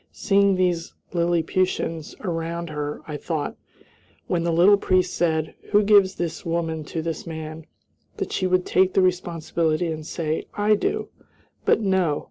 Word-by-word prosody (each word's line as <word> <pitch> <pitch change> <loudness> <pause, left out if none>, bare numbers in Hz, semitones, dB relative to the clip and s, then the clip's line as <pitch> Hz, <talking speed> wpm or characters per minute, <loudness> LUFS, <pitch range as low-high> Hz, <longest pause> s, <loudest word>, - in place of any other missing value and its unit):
Seeing 200 -1 +3
these 180 -2 0 0.2
Lilliputians 170 -1 0
around 170 -2 -3
her, 150 -1 -4
I 150 -2 -4
thought, 155 -2 -3 0.7
when 175 - 0
the 170 - +1
little 180 +5 +6
priest 185 -2 +1
said, 160 -2 0 0.2
"Who 205 +1 +6
gives 200 -2 +5
this 170 -1 -4
woman 165 -2 -2
to 160 +2 -4
this 165 +1 -4
man," 160 -1 -7 0.5
that - - -3
she 185 - 0
would 185 0 +2
take 185 0 +2
the 190 - +5
responsibility 170 -2 0
and 155 -1 -5
say, 155 0 -3
"I 210 +1 +3
do," 210 - -1 0.6
but - - +4
no! 190 -7 +1
170 Hz, 150 wpm, -24 LUFS, 160-185 Hz, 0.7 s, little